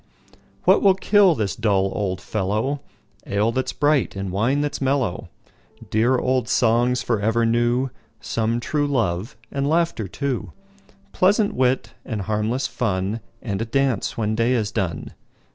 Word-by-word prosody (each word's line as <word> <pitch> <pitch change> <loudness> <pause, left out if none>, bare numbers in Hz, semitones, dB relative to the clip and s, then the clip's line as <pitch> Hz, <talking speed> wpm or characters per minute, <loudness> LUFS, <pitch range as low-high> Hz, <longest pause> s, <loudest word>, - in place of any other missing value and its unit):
What - - +5
will 195 -2 +5
kill 195 -2 +4
this 105 -6 -2
dull 100 -3 +1
old 95 -3 -2
fellow? 110 +8 -1 0.5
Ale 105 +3 +1
that 130 +2 -1
's - - -4
bright, 145 -6 +1
and 95 -1 -4
wine 120 +9 +1
that 145 0 -1
's - - -5
mellow! 130 -8 0 0.6
Dear 120 +4 +3
old 130 0 0
songs 120 +1 +2
for 115 -3 0
ever 115 +3 +1
new; 120 +3 +1 0.3
Some 115 +1 -1
true 145 +4 -1
love, 110 -7 -1
and 140 +1 -1
laughter 165 - +1
too; 135 +4 -3 0.6
Pleasant 200 +3 +2
wit, 125 -3 0
and 110 -3 -4
harmless 110 +5 -1
fun, 100 -1 -1 0.2
And 100 -3 -3
a - - -1
dance 135 +2 0
when 110 -1 0
day 115 +3 +2
is 110 -4 0
done. 90 -6 -3
115 Hz, 155 wpm, -22 LUFS, 105-135 Hz, 0.6 s, What